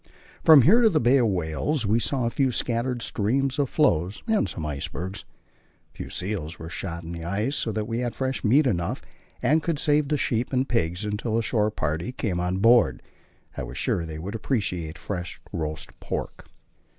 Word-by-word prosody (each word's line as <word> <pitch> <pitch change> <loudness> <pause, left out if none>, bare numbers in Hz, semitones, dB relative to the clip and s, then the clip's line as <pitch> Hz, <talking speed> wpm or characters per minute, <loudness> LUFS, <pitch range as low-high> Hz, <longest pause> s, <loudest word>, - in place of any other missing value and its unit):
From 155 -5 +8
here 220 - +6
to 225 - +6
the 160 -6 +2
Bay 125 +4 +4
of 120 -3 +3
Whales 95 - -1
we 110 +3 +3
saw 125 +2 0
a 115 - 0
few 135 0 +1
scattered 120 0 -1
streams 130 +6 0
of 140 -3 +1
floes 95 - +1
and 220 -2 +2
some 80 - -5
icebergs. 85 +7 -5 0.7
A - - -36
few - - -6
seals 90 -4 -3
were 80 +1 -8
shot 85 -2 -5
in 80 - -7
the 85 -1 -6
ice, 105 - -1
so 115 - -1
that 110 0 -2
we 115 +1 -2
had 120 -1 -2
fresh 130 0 -2
meat 135 +7 +4
enough, 85 -9 -1 0.4
and 150 +6 +3
could 165 -1 -1
save 150 0 +2
the 150 +1 +1
sheep 120 -2 -1
and 130 0 +1
pigs 90 -3 -1
until 105 +2 -2
the 115 - +1
shore 105 -2 +1
party 80 +2 -2
came 100 -8 -2
on 90 +1 -1
board. 115 +5 +4 0.5
I - - -4
was - - -6
sure 85 - 0
they 80 -1 -6
would 95 +7 -5
appreciate 95 - -2
fresh 90 -3 -5
roast 75 -1 -4
pork. - - -5
110 Hz, 200 wpm, -25 LUFS, 90-130 Hz, 0.7 s, From